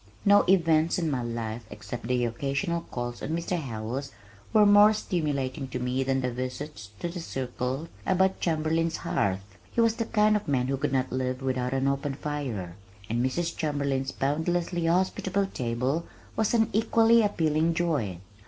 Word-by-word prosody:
No 205 0 +7
events 165 -2 +4
in 165 -4 0
my 130 -3 -1
life 115 -1 -4
except 110 +2 -7
my 125 - +3
occasional 140 +8 -1
calls 120 -1 -4
on - - -4
Mr. 170 +1 -2
Howells 125 +2 -4 0.4
were 215 -1 +6
more 205 +1 +7
stimulating 145 -8 -2
to 125 - -4
me 125 +1 -1
than 135 0 0
my 125 - 0
visits 130 -1 -5
to - - -1
the 175 +1 -5
circle 130 0 -3 0.2
about 190 0 +2
Chamberlin's 165 0 0
hearth 95 -1 -1 0.3
(he - - -3
was 230 -1 +3
the 230 - -1
kind 215 -1 +3
of 210 - -2
man 130 -3 +1
who 135 - 0
could 140 +1 -1
not 130 -1 0
live 130 +1 -2
without 130 -1 -1
an 135 +1 +1
open 140 0 -1
fire) 130 -13 -4 0.4
and 120 +1 +1
Mrs. 170 +6 -1
Chamberlin's 140 -3 -1
boundlessly 170 +4 0
hospitable 190 +2 +1
table 130 +1 -2 0.3
was 220 +1 +1
an 225 -1 +3
equally 225 +2 +5
appealing 165 -5 +1
joy. 145 - 0
145 Hz, 165 wpm, -27 LUFS, 125-175 Hz, 0.4 s, No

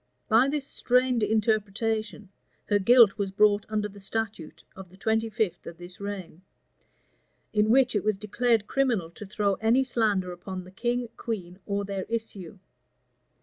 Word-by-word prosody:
By 235 +3 +5
this 285 0 -1
strained 250 -3 +1
interpretation, 215 0 -1 0.4
her 205 -1 +3
guilt 230 0 +6
was 200 -1 -1
brought 205 +1 +3
under 210 -1 -1
the 200 0 -14
statute 200 -4 -5
of 190 -1 -11
the 185 - -18
twenty 220 +2 0
fifth 220 -4 -2
of 170 - -8
this 175 +1 -11
reign; 200 -4 -7 1.1
in 210 0 +2
which 250 0 +4
it 205 - +1
was 215 -2 0
declared 220 +1 +1
criminal 230 -11 0
to 205 +4 -10
throw 200 0 0
any 235 +4 +3
slander 210 -7 0
upon 185 +1 -7
the 185 - -14
king, 240 +4 -2
queen, 185 -5 -5
or 200 -1 -1
their 195 -1 -4
issue. 210 -5 -5
210 Hz, 155 wpm, -27 LUFS, 195-230 Hz, 1.1 s, guilt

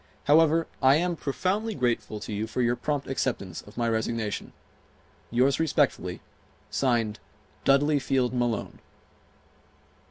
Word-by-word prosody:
However, 160 +2 +4 0.2
I 135 +1 +6
am 175 +2 +1
profoundly 195 +9 -1
grateful 120 -4 -1
to 110 - -5
you 105 +2 -2
for 125 +3 -1
your 120 0 +2
prompt 145 +1 -2
acceptance 115 -9 -2
of 105 - -16
my 120 -1 +1
resignation. 110 -1 -2 0.8
Yours 130 +4 +2
respectfully, 160 -3 0 0.5
(Signed) 115 -5 0 0.5
DUDLEY 145 +2 +4
FIELD 130 -2 0
MALONE. 120 -2 -2
130 Hz, 120 wpm, -27 LUFS, 115-150 Hz, 0.8 s, I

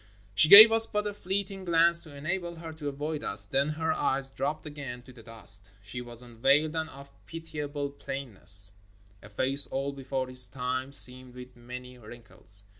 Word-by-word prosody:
She 130 +10 +3
gave 215 +3 +10
us 225 0 +5
but 210 0 -4
a 205 - -4
fleeting 195 0 -5
glance 170 0 +3
to 155 -3 -10
enable 170 +4 -5
her 165 -1 -10
to 150 -2 -7
avoid 150 +2 -6
us, - - +3
then 140 +2 -2
her 160 +1 -3
eyes 135 -2 -1
dropped 150 +4 -5
again 140 -5 -9
to 130 - -16
the 120 - -16
dust. 110 -3 -7
She 105 +5 -9
was 120 0 -11
unveiled 135 +7 0
and 160 0 -4
of 140 -1 -15 0.2
pitiable 150 -3 -7
plainness; 105 -8 +2 0.5
a 100 - -15
face 135 +7 +4
old 140 +1 -4
before 135 -1 -5
its 125 -1 +3
time, 130 +1 -5
seamed 130 -2 +1
with 125 0 -13
many 125 +1 -12
wrinkles. 105 -3 -7
140 Hz, 180 wpm, -27 LUFS, 125-160 Hz, 0.5 s, gave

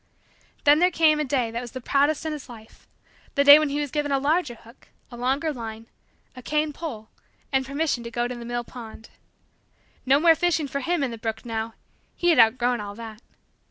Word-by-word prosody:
Then 295 +1 +6
there 360 +1 +4
came 315 -3 +3
a - - +1
day 255 -5 -1
that 235 +1 -4
was 240 -2 -9
the 260 - -5
proudest 285 +5 +1
in 315 - -2
his 295 -4 -9
life 220 -2 -14 0.5
the 280 - +3
day 285 +1 +10
when 305 -1 0
he 285 +1 -2
was 290 -2 -3
given 295 -1 -2
a 275 - +3
larger 290 -1 0
hook, 230 +2 -19 0.2
a - - -8
longer 270 +6 -1
line, 225 -3 -7 0.5
a 255 - -9
cane 300 +3 -1
pole, 235 -10 -7 0.4
and 265 -1 0
permission 280 -3 -1
to - - -5
go 240 +1 -1
to 250 - -5
the 240 -1 -8
mill 240 0 -3
pond. 230 -2 -11 0.9
No 270 +2 +4
more 330 +1 +6
fishing 325 -2 0
for 280 +1 -3
him 335 +2 -1
in 260 - -1
the 230 - -8
brook 225 +1 -4
now! 225 -1 -4 0.4
He 350 - +1
had 325 - +4
outgrown 240 +1 +3
all 205 0 -7
that. 225 -1 -10
265 Hz, 215 wpm, -24 LUFS, 235-300 Hz, 0.9 s, day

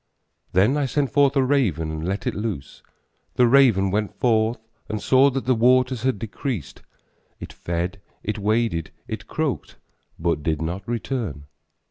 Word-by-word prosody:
Then 105 +10 +4
I 145 -2 +1
sent 140 +1 0
forth 140 -1 +3
a 135 - +4
raven 110 - +1
and 80 +2 -4
let 100 +2 -2
it - - 0
loose, 105 -9 -5 0.5
The 125 - +5
raven 115 -7 +5
went 105 +1 -2
forth 115 -1 +2 0.3
and 110 - -2
saw 130 +7 +5
that 135 0 -3
the 130 - +3
waters 125 +1 +3
had 130 -3 +1
decreased; 110 - -5 0.6
It - - -8
fed, 90 +3 -3 0.2
it 105 +1 -3
waded, 105 -6 0 0.2
it - - -6
croaked, - - -3 0.4
but 85 -2 0
did 80 0 -1
not 90 +5 -4
return. 115 - -3
110 Hz, 155 wpm, -23 LUFS, 90-130 Hz, 0.6 s, The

